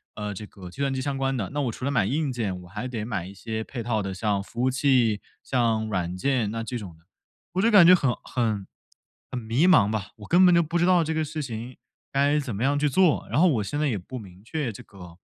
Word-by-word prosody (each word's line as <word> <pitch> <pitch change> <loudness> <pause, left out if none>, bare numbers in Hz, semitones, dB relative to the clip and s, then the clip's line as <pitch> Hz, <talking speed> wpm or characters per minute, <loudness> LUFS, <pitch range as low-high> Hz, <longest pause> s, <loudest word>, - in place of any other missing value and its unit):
呃 105 -1 -4
这 105 +2 -7
个 90 -4 -11
计 135 - -8
算 140 -1 +1
机 130 - -2
相 140 +1 -2
关 135 0 0
的， 105 -6 -3
那 145 - -1
我 130 -4 -1
除 120 - -10
了 140 - 0
买 120 -8 +2
硬 145 +2 0
件 105 -7 -3
我 - - -13
还 105 +7 -5
得 115 -4 -4
买 100 -6 -3
一 95 - -10
些 110 +3 -4
配 120 0 -6
套 110 -2 0
的 95 -1 -4
像 100 0 0
服 115 +4 -6
务 130 - +3
器、 125 -6 +2 0.2
像 115 -4 +1
软 90 -3 -2
件 125 0 0
那 115 +1 -3
这 125 +2 -4
种 90 -7 -10
的， 80 - -28 0.5
我 185 - +1
就 230 - +4
感 205 -6 +8
觉 180 - +9
很 140 -8 +3
很 110 -5 -1 0.6
很 125 - -4
迷 120 +9 +1
茫 105 - +5
吧， 110 -3 -2
我 105 - -11
根 175 +2 +5
本 180 -1 +6
就 170 - +5
不 165 +2 -1
知 175 - +3
道 180 -2 +5
这 160 0 -2
个 160 0 0
事 155 +1 -4
情 120 0 -7 0.3
该 140 +2 +2
怎 130 -7 -4
么 105 - -2
样 140 +2 +2
去 150 - +2
做， 180 +2 +3
然 - - +1
后 185 - +6
我 115 -9 +1
现 100 +9 -4
在 150 - +1
也 115 - -1
不 100 +8 -8
明 95 -5 -11
确 140 +1 -3
这 100 - -10
个， 90 -4 -13
120 Hz, 290 characters per minute, -25 LUFS, 105-145 Hz, 0.6 s, 觉